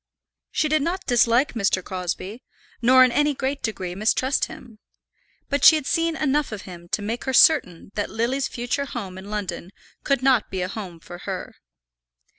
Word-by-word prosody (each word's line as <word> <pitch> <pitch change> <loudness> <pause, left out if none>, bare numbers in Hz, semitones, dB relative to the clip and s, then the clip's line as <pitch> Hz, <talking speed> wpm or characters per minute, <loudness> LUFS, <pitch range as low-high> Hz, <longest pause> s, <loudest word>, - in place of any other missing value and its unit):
She 310 - 0
did 310 0 +2
not 345 +5 -2
dislike 240 +2 +3
Mr. 195 -4 0
Crosbie, 185 +5 -5 0.4
nor 255 +2 +7
in 255 - +4
any 295 +2 +2
great 270 +2 -2
degree 190 -6 -3
mistrust 220 +7 +1
him; 230 -4 -13 0.7
but 285 0 -1
she 320 - +9
had 305 - -2
seen 330 +2 0
enough 295 -2 0
of 210 -3 -6
him 175 -2 -11
to 205 - 0
make 225 +4 -4
her 265 - -1
certain 265 - +4
that 205 - -2
Lily's 245 +5 -1
future 245 +4 -3
home 195 -9 -6
in 195 +2 -10
London 205 -4 -4 0.3
could 275 -3 0
not 260 -4 +3
be 185 -1 -3
a - - -2
home 185 -4 -7
for 175 +1 -11
her. - - -5
235 Hz, 180 wpm, -23 LUFS, 195-275 Hz, 0.7 s, she